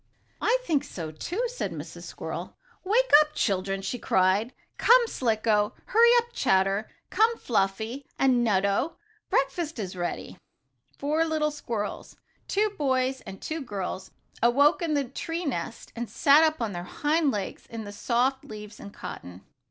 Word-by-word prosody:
"I - - +3
think 310 - +1
so, 160 -4 -6
too," 350 - -3
said - - -4
Mrs. - - -8
Squirrel. - - -6 0.3
"Wake 460 +6 +2
up, 300 0 -3
children!" 195 -1 0
she 245 - -3
cried. 190 +6 +2 0.3
"Come, 485 +1 +6
Slicko! 220 - +1
Hurry 465 +2 +5
up, 475 0 0
Chatter! 195 - +1 0.2
Come, 455 +2 +3
Fluffy 220 +5 -1
and 255 -3 +3
Nutto! 200 - +1 0.3
Breakfast 300 +3 0
is 190 -4 -4
ready!" 175 -1 -4 0.6
Four 305 +3 +1
little 310 -1 0
squirrels 230 -8 -5 0.3
two 420 +1 +1
boys 265 -6 0
and 195 0 -8
two 320 0 -4
girls 190 -5 -5 0.3
awoke 280 +8 +4
in 320 -3 0
the 285 - +2
tree 330 +7 -4
nest 230 - -4
and 235 -2 -4
sat 280 +7 +5
up 310 -5 +1
on 220 - -2
their 175 -2 -5
hind 300 - +1
legs 205 -6 -4
in 230 -1 -6
the 205 - -7
soft 250 +5 0
leaves 210 0 -10
and 200 - -9
cotton. 90 - -9
250 Hz, 150 wpm, -27 LUFS, 205-310 Hz, 0.6 s, Come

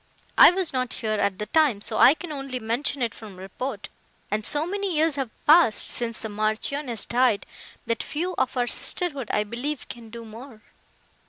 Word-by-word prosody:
I - - +10
was 360 -3 -1
not 255 -2 -1
here 215 -3 -2
at 200 -2 0
the 210 - -4
time, 280 -2 +2
so 220 +2 -3
I 275 - +7
can 320 +1 -8
only 275 -3 -4
mention 245 +4 -1
it 230 - -1
from 210 -4 -11
report, 205 +4 -6 0.4
and 215 +1 -1
so 295 +7 +3
many 395 0 -2
years 315 +1 +2
have 270 -4 -3 0.2
passed 310 -7 +5
since 230 -2 -2
the - - -2
Marchioness 220 +4 -2
died, 240 -4 +2 0.4
that 230 -1 -1
few 350 +4 -3
of 255 - -1
our 245 - +2
sisterhood, 280 - -2
I 210 - +1
believe, 245 +7 -5
can 235 -2 -9
do 230 0 -9
more." 225 +1 -12
245 Hz, 185 wpm, -25 LUFS, 220-295 Hz, 0.4 s, I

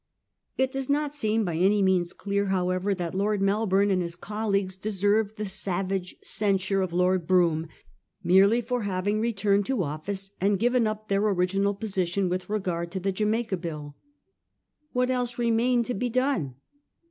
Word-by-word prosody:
It 265 0 +1
does 270 0 -4
not 290 0 +1
seem 220 -6 0
by 170 -3 -2
any 195 +3 +3
means 185 -2 +2
clear, 200 0 -2
however, 185 +1 0
that 175 -2 -4
Lord 205 +2 0
Melbourne 200 0 +2
and 185 -1 +2
his 170 -1 -4
colleagues 200 -1 -2
deserved 205 +2 0
the 210 - -3
savage 190 -1 -2
censure 195 -2 0
of 185 -2 -2
Lord 180 -1 +1
Brougham 170 -3 +3 0.6
merely 195 +6 +5
for 245 +1 -2
having 205 +1 -1
returned 205 -3 +1
to 260 -8 0
office 190 +6 -4
and 200 +1 +3
given 240 +1 +2
up 215 0 -4
their 200 0 +1
original 195 0 +1
position 190 -2 -1
with 180 +2 -3
regard 180 -5 -2
to 190 - -2
the 195 +2 -1
Jamaica 215 +1 0
Bill. 150 -4 -6 1.0
What 250 0 +1
else 245 -1 -1
remained 235 +1 +2
to 250 - -2
be 245 +4 -2
done 245 - 0
200 Hz, 160 wpm, -26 LUFS, 185-215 Hz, 1.0 s, merely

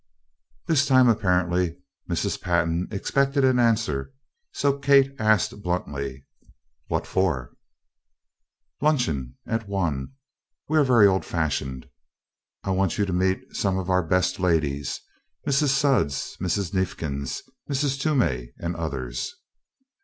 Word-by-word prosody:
This 155 -4 +2
time, 130 -2 +6
apparently, 90 -5 +1 0.3
Mrs. - - -1
Pantin 85 -1 0
expected 135 +6 +1
an 130 -1 +3
answer, 115 - +1 0.4
so 140 0 0
Kate 140 -1 +5
asked 110 -2 +2
bluntly: 70 -7 -3 0.6
"What - - -1
for?" 80 -11 -1 1.3
"Luncheon. 80 - 0
At 115 -2 -2
one 85 - -2 0.5
we 155 +1 +3
are - - +5
very 120 -6 +6
old 95 -1 +3
fashioned. 70 -5 -2 0.8
I 95 - -1
want 95 -2 +1
you 100 - +2
to 95 - -3
meet 95 +1 -1
some 95 -2 0
of 95 0 -2
our 90 0 +4
best 90 +3 +1
ladies 75 -6 0 0.5
Mrs. 140 +1 +3
Sudds 135 - +1
Mrs. 95 +1 -1
Neifkins 80 -8 -2 0.3
Mrs. 140 -1 0
Toomey 120 - 0
and 85 0 -3
others." 70 - -4
95 Hz, 120 wpm, -25 LUFS, 80-125 Hz, 1.3 s, time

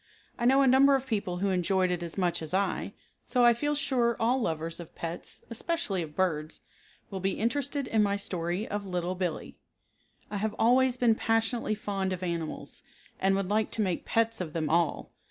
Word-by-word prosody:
I 240 - 0
know 270 +2 +5
a - - +4
number 270 +2 +6
of 270 -1 -1
people 205 -7 -2
who 195 +2 0
enjoyed 185 0 +1
it 175 -1 -1
as 170 +1 -4
much 180 -3 0
as 160 +3 -3
I, 195 0 -1 0.3
so 250 -2 +2
I 240 - +7
feel 295 +5 -1
sure 250 -5 +1
all 245 +3 +2
lovers 165 -3 -2
of 170 - -10
pets, 165 0 -6
especially 230 - -1
of 155 -2 -7
birds, 160 -5 -1 0.5
will 195 - -4
be 190 +1 -1
interested 280 +4 0
in 220 - +2
my 200 -1 +2
story 180 +1 -3
of 205 0 -3
"Little 180 -1 -2
Billee." 180 -3 -4 0.7
I 205 - -2
have 215 +1 -2
always 255 +2 +4
been 240 -2 +4
passionately 225 0 +1
fond 195 -2 -2
of 185 0 -5
animals 170 -3 -4 0.4
and 195 0 +3
would 195 -1 -1
like 215 0 +2
to 220 - +1
make 185 -4 -1
pets 225 -2 0
of 160 -4 -5
them 155 -2 -1
all. 170 -1 +1
200 Hz, 195 wpm, -29 LUFS, 180-235 Hz, 0.7 s, I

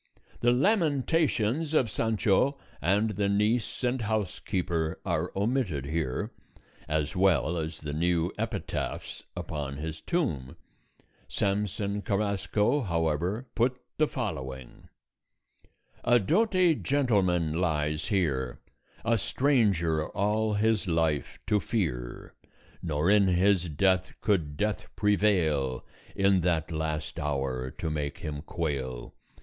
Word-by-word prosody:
The 120 - +4
lamentations 155 - +2
of 130 - +4
Sancho 115 +5 +2 0.2
and 105 +5 +2
the 100 0 0
niece 110 +4 +1
and 125 0 +1
housekeeper 90 -6 -1
are - - -1
omitted 100 - 0
here, 75 -3 -2 0.6
as 75 +2 -1
well 90 -4 +3
as 80 -1 -4
the 75 -1 -4
new 85 +2 +1
epitaphs - - -4 0.2
upon 70 -2 -4
his 80 +1 -5
tomb; 80 - -2 0.7
Samson 100 0 -1
Carrasco, 105 +5 +1
however, 85 - -1
put 125 +2 +1 0.2
the 155 - +4
following: 65 - -5 1.1
"A 120 - +5
doughty 185 - +3
gentleman 100 - +1
lies 75 -3 0
here, 75 - 0 0.5
A 115 -1 +3
stranger 95 - +2
all 105 +2 +1
his 110 -1 +2
life 80 -5 0
to 105 - +2
fear; 75 - -3 0.5
Nor 80 +2 +1
in 105 -2 +5
his 90 0 +3
death 95 +4 +2
could 80 -9 0
Death 105 +3 -1
prevail, 90 - +2 0.3
In 100 -1 +3
that 85 -2 0
last 80 0 -3
hour, 65 -4 -2
to 80 +3 -4
make 75 -2 -3
him 75 -2 -4
quail. 70 -7 -3
95 Hz, 110 wpm, -28 LUFS, 75-110 Hz, 1.1 s, A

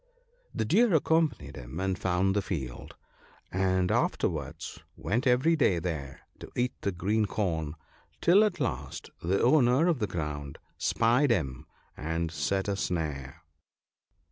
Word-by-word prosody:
The - - -2
Deer 230 -6 +4
accompanied 145 - +1
him, 60 +7 -7
and 95 0 0
found 95 +1 +1
the 100 - +2
field, 70 -11 -5 0.6
and 95 -1 +1
afterwards - - -1 0.2
went 120 +6 0
every 130 +7 +4
day 115 - +3
there 80 -5 -4 0.2
to - - -9
eat 125 +1 0
the 100 - 0
green 105 +5 0
corn, 80 -7 -2 0.4
till 190 +5 +6
at 205 -6 0
last 130 - -3
the 95 +4 +1
owner 130 +2 +5
of 165 -7 +2
the 105 - 0
ground 75 -5 -4 0.2
spied 120 +5 +3
him 70 - -1 0.3
and 80 +1 -2
set 95 +3 -1
a 100 - 0
snare. 80 -5 -3
95 Hz, 140 wpm, -29 LUFS, 80-125 Hz, 0.6 s, till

